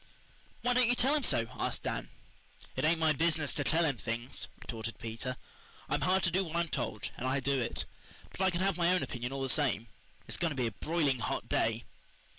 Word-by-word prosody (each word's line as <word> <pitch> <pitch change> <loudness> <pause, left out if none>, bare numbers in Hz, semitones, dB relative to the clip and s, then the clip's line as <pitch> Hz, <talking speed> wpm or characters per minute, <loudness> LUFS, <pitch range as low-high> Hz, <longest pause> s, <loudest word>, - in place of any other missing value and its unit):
"Why 245 - +3
don't 250 -1 +4
you 245 - +4
tell 265 +4 +3
him 305 - +3
so?" 115 - +3
asked - - -1
Dan. - - -2 0.7
"It 130 - -1
ain't 165 +2 +4
my 160 -1 +4
business 155 -1 +2
to 145 - -1
tell 165 +4 +3
him 140 -5 +1
things," 120 +3 -3
retorted 115 -1 -5
Peter. 115 +3 -4 0.5
"I'm - - 0
hired 185 +1 +3
to 170 - +3
do 190 +3 +2
what 165 -2 -6
I'm 170 -1 +1
told, 120 -7 -2
and 130 - -2
I 135 +2 +2
do 135 0 +1
it. 115 - -1 0.5
But - - -6
I 190 - +5
can 175 0 -1
have 195 -2 +2
my 175 0 +4
own 185 - +3
opinion 120 0 -4
all 135 0 -2
the - - 0
same. 120 -5 +2 0.4
It's - - -2
going 170 - +1
to 145 - -4
be 125 - +2
a 115 - 0
broiling 150 - +1
hot - - -2
day." - - +1
150 Hz, 230 wpm, -32 LUFS, 125-170 Hz, 0.7 s, I